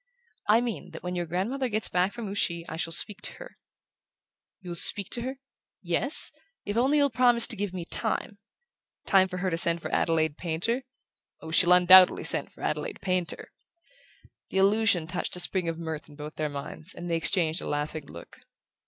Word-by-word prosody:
"I 220 +3 +5
mean 230 -9 -5
that - - -10
when 180 0 -4
your 175 -1 -4
grandmother 235 +10 -3
gets 215 0 0
back 180 +2 0
from 235 -1 -7
Ouchy 170 -4 -3
I - - -7
shall 165 0 -4
speak 210 +5 +3
to - - -4
her - - -13 0.5
" - - -54
"You'll 180 -2 -8
speak 190 +3 +5
to 240 - +2
her...?" 260 +3 -5 0.5
"Yes; - - +3 0.3
if 205 - -4
only 265 +5 +2
you'll 285 -2 +2
promise 240 0 +3
to - - +3
give 205 -2 -4
me 180 -2 -7
time 200 +3 -2 0.3
" - - -66 0.3
"Time 190 -1 +4
for 185 -1 -7
her 185 0 -2
to 165 - +2
send 170 0 +2
for - - -7
Adelaide 160 -2 0
Painter?" 185 +10 -2 0.5
"Oh, 160 - -10
she'll 175 +2 +3
undoubtedly 180 +1 +6
send - - +3
for - - -14
Adelaide 485 -4 -4
Painter!" 185 -2 -2 1.0
The - - -4
allusion 195 -3 +2
touched 165 - -2
a - - -5
spring 180 -1 +1
of 165 - -5
mirth 160 -2 -7
in 145 - -15
both 150 +1 -9
their 155 -1 -3
minds, 145 +5 -7
and 175 - -8
they 165 -1 -1
exchanged 165 -1 +1
a - - -7
laughing 150 0 -4
look. 85 - -13
180 Hz, 195 wpm, -26 LUFS, 165-210 Hz, 1.0 s, undoubtedly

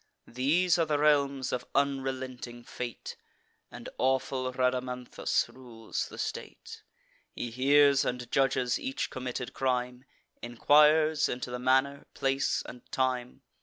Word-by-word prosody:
These 165 +9 +2
are 165 - +3
the 150 -1 +1
realms 140 -3 +2
of 125 0 -3
unrelenting 130 -3 -2
fate; 120 -1 -7 0.5
And - - -10
awful 130 0 0
Rhadamanthus 125 -1 -1
rules 120 -4 -6
the - - -11
state. - - -6 0.5
He 120 - -4
hears 140 +2 +4
and 125 -1 -4
judges 130 -2 +1
each 265 0 -3
committed 125 0 -5
crime; 125 -1 -2 0.4
Enquires 150 +5 +4
into 125 0 -4
the 125 - -4
manner, 135 +2 +1
place, 135 0 0
and 125 - -10
time. 125 -2 -2
130 Hz, 120 wpm, -29 LUFS, 125-140 Hz, 0.5 s, hears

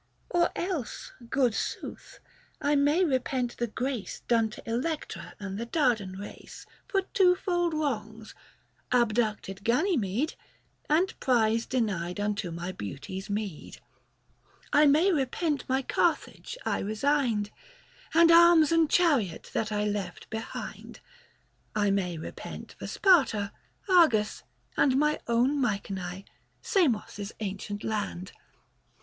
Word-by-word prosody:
Or 345 0 +3
else, 345 - -4 0.2
good 255 -4 +2
sooth, - - -5 0.4
I 290 +1 +2
may 295 +6 +3
repent 255 -3 -1
the 240 - -1
grace 245 0 -4
Done 230 -2 +3
to 215 - -12
Electra 235 - -3
and 200 -1 -5
the 235 - -4
Dardan 235 - +1
race 205 +1 -10 0.2
For 390 -2 +1
twofold 360 -3 +2
wrongs 220 -7 -3 0.3
— - - -40
abducted 215 -5 0
Ganymede, 245 - +1 0.6
And 335 +5 +3
prize 230 -2 +2
denied 195 -7 -1
unto 205 -2 -1
my 170 +2 -4
beauty's 165 - -7
meed; 200 -5 -4
50 - - -14 0.9
I 300 +1 +6
may 315 +7 +5
repent 290 -1 -1
my 265 +1 +1
Carthage 345 - -1
I - - 0
resigned, 220 -1 0 0.6
And 335 0 +7
arms 335 -2 +7
and 330 -2 +4
chariot 275 - +2
that 220 -1 -1
I 210 0 0
left 200 -4 -3
behind; 220 0 -6 0.8
I 205 -1 +2
may 180 -4 0
repent 160 - -8
for - - -6
Sparta, 265 - +3 0.4
Argos, 315 - +4 0.3
and 265 -2 +3
My 300 +1 +2
own 245 +5 +2
Mycenae, 195 -4 -3 0.4
Samos' 230 - 0
ancient 205 0 -5
land, 205 -4 -3
Book - - -26
VI. - - -27
235 Hz, 125 wpm, -28 LUFS, 205-300 Hz, 0.9 s, And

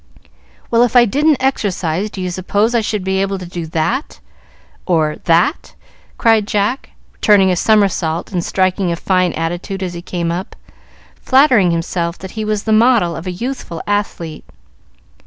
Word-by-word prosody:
"Well, 230 0 +4
if 245 0 +2
I 245 -1 +7
didn't 290 +6 +2
exercise, 195 -7 -1
do 195 - -7
you 180 -1 -3
suppose 200 +5 0
I 235 - +2
should 210 -2 -2
be 190 0 0
able 195 0 -1
to 185 - -8
do 170 -1 -6
that 165 - -2 0.7
or 155 -4 +1
that?" 170 - +1 0.4
cried 225 -3 +3
Jack, 210 +6 -1 0.3
turning 195 -3 +5
a - - +1
somersault 185 -5 +1
and 180 -3 -1
striking 185 -1 0
a - - 0
fine 185 +1 +1
attitude 175 +4 -4
as 180 -2 -4
he 170 - -7
came 170 -1 -3
up, 180 +3 -5 0.7
flattering 260 -9 +4
himself 170 +1 -2
that 190 -1 -9
he 220 - -4
was 215 -1 -2
the 220 - +1
model 220 -7 +3
of 165 - -7
a - - -2
youthful 230 -4 -5
athlete. 190 -6 -3
190 Hz, 165 wpm, -17 LUFS, 175-220 Hz, 0.7 s, I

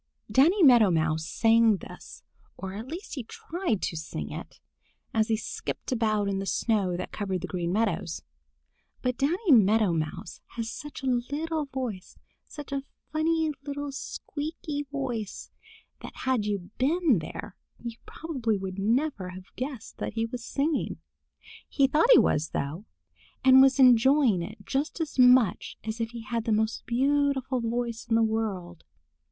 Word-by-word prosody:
DANNY 340 +9 +5
MEADOW 240 -8 +7
MOUSE 160 -1 0
sang 225 0 +4
this, - - -11 0.3
or 190 -1 -6
at 220 +5 -6
least 335 +7 -7
he 260 - -4
tried 320 - -3
to - - -2
sing 155 - -5
it, - - -8 0.5
as 220 -1 +2
he 220 - +1
skipped 225 - -5
about 215 -4 +1
on 195 -1 -1
the 195 - -4
snow 195 -7 +1
that 185 - -5
covered 190 -4 -3
the 185 - -4
Green 175 -2 -2
Meadows. 200 -5 -1 0.8
But 250 -1 0
Danny 335 +7 +1
Meadow 215 -5 +5
Mouse 160 +4 -4
has 230 -1 -3
such 295 -1 -8
a 255 -2 +2
little 315 +1 -2
voice, 255 -8 -5 0.3
such 295 -1 -9
a 275 0 -1 0.3
funny 320 0 +1
little 285 0 -4
squeaky 290 +1 -5
voice, 245 -7 -4 0.5
that - - -9
had 255 -5 +1
you 200 -2 -3
been 295 - +3
there 160 +4 -7 0.2
you 235 -1 -7
probably 255 -10 -2
would 190 0 -5
never 225 -2 0
have 185 +1 -12
guessed 255 -3 -6
that - - -3
he 225 0 0
was 235 +1 -6
singing. 290 +4 -1 0.7
He 275 - +3
thought 300 - +3
he - - +10
was, 155 +2 +2
though, 155 +9 -3 0.6
and 260 0 +9
was 270 0 +5
enjoying 255 -4 +5
it 200 +3 -8
just 280 - -2
as 315 -4 -3
much 250 -4 +5
as 220 +1 -4
if 225 - -1
he 235 0 -8
had 230 0 -3
the 225 - 0
most 220 +1 0
beautiful 270 0 +1
voice 235 0 -3
in 225 - +3
the 225 - +4
world. 200 -6 -2
235 Hz, 160 wpm, -27 LUFS, 205-280 Hz, 0.8 s, he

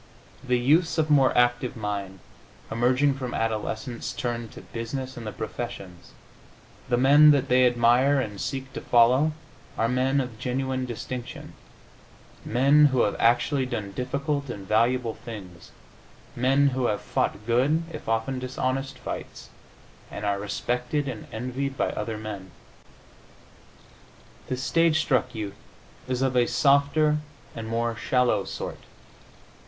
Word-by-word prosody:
The 125 -2 +1
youths 155 +9 +2
of 155 -1 +1
more 135 -3 +5
active 120 +1 +2
mind, 100 -3 -4 0.5
emerging 125 +5 +2
from 130 -2 -5
adolescence, 115 +2 -3
turn 120 -2 -3
to - - -11
business 130 +3 -5
and 115 -2 -7
the - - -3
professions; 105 -7 -7 0.8
the 120 - +2
men 145 +4 +7
that 140 -2 +3
they 125 0 +5
admire 125 +4 +3
and 105 -6 -4
seek 135 -1 -4
to - - -5
follow 125 +6 +4 0.4
are 115 - +2
men 130 +3 +1
of 125 -4 -4
genuine 130 0 -2
distinction, 125 +1 -7 0.9
men 140 +5 +4
who 130 -3 +3
have 105 - +1
actually 125 +3 +2
done 110 -6 -4
difficult 140 +5 -2
and 100 -5 -7
valuable 115 +2 +2
things, 105 -8 -10 0.7
men 135 +3 +3
who 130 -2 0
have 105 - -1
fought 105 - -2
good 130 +8 +2
(if - - -7
often 115 +4 0
dishonest) 130 +1 -3
fights - - -7 0.6
and 105 - -6
are 100 -1 0
respected 125 +7 -2
and 120 -5 -6
envied 130 +4 -4
by - - 0
other 110 +1 -4
men. 105 -3 -7 2.0
The 130 - -2
stage 165 +4 +2
struck 130 -5 0
youth 100 -2 -5 0.5
is 130 0 -1
of 130 -1 0
a 120 -1 +4
softer 150 +2 +3 0.4
and 115 -1 -6
more 115 +1 -1
shallow 120 -3 +1
sort. - - -6
125 Hz, 135 wpm, -26 LUFS, 115-135 Hz, 2.0 s, men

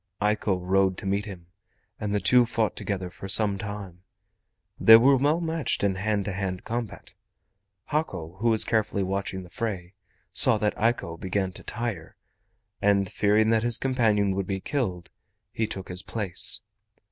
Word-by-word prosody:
Eiko 105 -2 +1
rode 95 +1 +1
to - - -7
meet 100 +2 -1
him, 95 -5 -9 0.5
and 105 -1 -3
the 105 - +1
two 125 +4 +5
fought 115 -4 -1
together 95 -3 -4
for 95 - -9
some 100 -1 +4
time. 100 -4 -7 0.8
They 115 0 +9
were 135 +4 +5
well 145 +5 +2
matched 160 -8 -1
in 100 -2 +1
a - - -6
hand 105 0 -1
to 100 - -3
hand 95 -1 -4
combat. 115 -2 -5 0.7
Hako, 95 - -3
who 115 +2 +2
was 110 -1 +4
carefully 110 -3 0
watching 95 0 -3
the 90 - -14
fray, 95 -5 -4 0.4
saw 130 -6 +3
that 105 0 -1
Eiko 110 -7 -1
began 95 0 -2
to - - -9
tire, 115 -9 -5 0.7
and 100 -2 +2
fearing 105 +2 +2
that 110 -1 +3
his 120 0 +3
companion 110 -7 +1
would 95 -1 -3
be 95 -1 -2
killed, 95 - -3 0.4
he 110 - -1
took 95 -3 -6
his 90 0 -4
place. 100 -3 0
100 Hz, 170 wpm, -26 LUFS, 95-115 Hz, 0.8 s, They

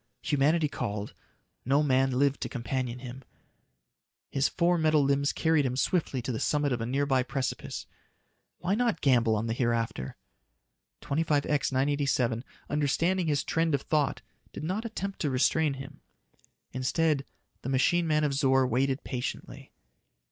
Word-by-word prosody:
Humanity 150 +3 +2
called; 105 -6 -4 0.5
no 140 +4 +3
man 135 -2 +3
lived 140 0 +2
to - - -3
companion 125 -1 -3
him. 125 +1 -9 1.1
His 135 0 +2
four 175 0 +2
metal 155 -2 +3
limbs 140 +1 +2
carried 160 -2 +2
him 130 -1 -1
swiftly 135 -5 0
to 130 - -2
the 110 - -3
summit 145 -1 +1
of 120 - -2
a 115 - -2
nearby 135 0 +1
precipice. 130 +1 -4 0.7
Why 185 - -1
not 235 0 +1
gamble 120 -5 +3
on 105 +1 -1
the 115 - -1
hereafter? 115 - -1 0.9
25X 150 -1 +1
987, 130 -3 +1 0.2
understanding 165 +5 +1
his 145 -2 +1
trend 165 -2 +1
of 140 - -4
thought, 150 -3 0 0.3
did - - -7
not 190 +8 -2
attempt 200 -3 -4
to 150 - 0
restrain 140 +3 +2
him. 135 +2 -10 0.7
Instead, 140 +3 +1 0.4
the 130 - -5
machine 165 +6 +2
man 155 -1 +2
of 145 -2 +1
Zor 135 -1 +3
waited 130 +2 0
patiently. 125 -2 -5
140 Hz, 145 wpm, -29 LUFS, 130-155 Hz, 1.1 s, no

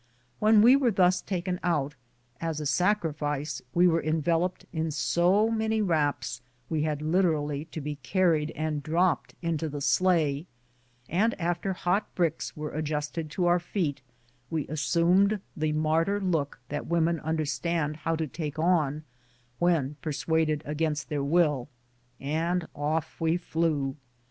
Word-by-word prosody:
When 215 0 +6
we 245 +3 +8
were 275 -3 +3
thus 185 -3 +3
taken 180 -1 -3
out, 150 -5 0 0.5
as 165 -2 -2
a 150 - -4
sacrifice 150 -4 0
we 175 +4 +4
were 165 -1 +2
enveloped 165 +3 0
in 160 -1 -1
so 180 +8 +2
many 220 0 0
wraps 150 - 0 0.3
we 155 -2 +1
had 150 -1 -1
literally 155 -4 +1
to 160 - -7
be 150 0 -4
carried 160 +2 +1
and 155 -1 -2
dropped 165 +4 0
into 165 -2 -1
the 145 0 -5
sleigh, 150 +1 +2 0.6
and 210 +6 +1
after 175 +3 -1
hot 180 +3 -1
bricks 165 -4 -1
were 150 0 -4
adjusted 155 +1 -3
to 175 +4 -1
our 175 0 +4
feet, 170 -5 -2 0.5
we 160 -3 -2
assumed 175 +7 +3 0.2
the 155 0 0
martyr 160 +6 +1
look 160 -9 -1
that 145 +1 -4
women 170 -1 +1
understand 155 0 -1
how 165 +1 -1
to 160 0 -1
take 150 +1 -5
on 155 -3 +1 0.6
when 155 -5 +1
persuaded 155 -1 0
against 150 0 -2
their 145 -2 -1
will, 150 -4 +2 0.5
and 165 +4 -1
off 155 +2 -2
we 165 +1 +2
flew. 160 -5 -1
160 Hz, 140 wpm, -28 LUFS, 150-175 Hz, 0.6 s, we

